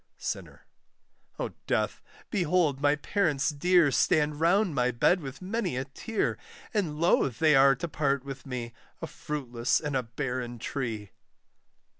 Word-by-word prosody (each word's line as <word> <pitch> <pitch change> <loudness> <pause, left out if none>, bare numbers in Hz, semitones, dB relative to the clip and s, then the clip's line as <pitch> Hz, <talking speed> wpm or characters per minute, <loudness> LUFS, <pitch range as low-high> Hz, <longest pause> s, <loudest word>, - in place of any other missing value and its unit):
SINNER. - - -6 0.7
O - - -2 0.2
Death; - - 0 0.3
behold 170 - +1
my 145 0 +4
parents 150 -4 0
dear 170 0 +4
Stand 150 +1 +2
round 180 +2 +3
my 125 -2 +2
bed 125 +9 +3
with 135 +4 -8
many 195 - -2
a 130 - -2
tear, 210 - -2 0.3
And 170 -9 -1
loath 140 -7 +2
they 155 0 +4
are 135 0 +6
to 170 - -4
part 140 -3 0
with 135 -1 -7
me, 120 -3 -5 0.3
A - - -4
fruitless 125 -5 -2
and 150 -2 -3
a 130 - +2
barren 125 0 -4
tree. 115 -5 -4
145 Hz, 145 wpm, -28 LUFS, 130-170 Hz, 0.7 s, are